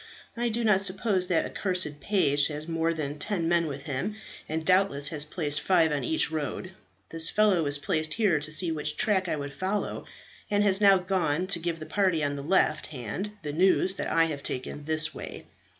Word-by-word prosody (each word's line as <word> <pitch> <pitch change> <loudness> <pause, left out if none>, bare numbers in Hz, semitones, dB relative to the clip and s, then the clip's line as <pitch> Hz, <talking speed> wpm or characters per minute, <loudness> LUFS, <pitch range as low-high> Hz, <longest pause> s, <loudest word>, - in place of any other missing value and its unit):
I 240 0 -1
do 230 +1 -1
not 210 -4 +3
suppose 190 -1 +1
that 170 -3 +1
accursed 180 -7 0
page 145 -9 +2
has 150 0 -6
more 165 0 0
than 150 -2 -5
ten 175 -2 -1
men 170 -1 +2
with 140 -1 -6
him, 145 +9 -3 0.3
and 160 +1 -3
doubtless 185 -6 +3
has 150 -2 +1
placed 150 -2 -1
five 170 -4 +3
on 145 -3 -2
each 160 +3 0
road. 160 +4 -4 0.4
This 165 0 +4
fellow 210 -5 +3
was 145 -2 +2
placed 155 +2 -2
here 200 -9 +2
to 150 +1 -5
see 165 +2 +1
which 150 -1 -4
track 190 -4 +1
I - - 0
would 140 -1 -6
follow, 190 +7 -3 0.4
and 205 0 +2
has 200 0 +2
now 195 -1 +6
gone 180 -3 -1
to 185 -2 +1
give 170 0 -3
the 155 - -8
party 185 -6 0
on 145 0 -1
the 140 - -5
left 155 0 +1
hand 155 - -6
the 145 -1 -4
news 185 +2 +3
that - - -3
I 165 - +3
have 150 -3 -5
taken 140 +2 -4
this 155 0 +2
way. - - -9
165 Hz, 205 wpm, -27 LUFS, 150-190 Hz, 0.4 s, now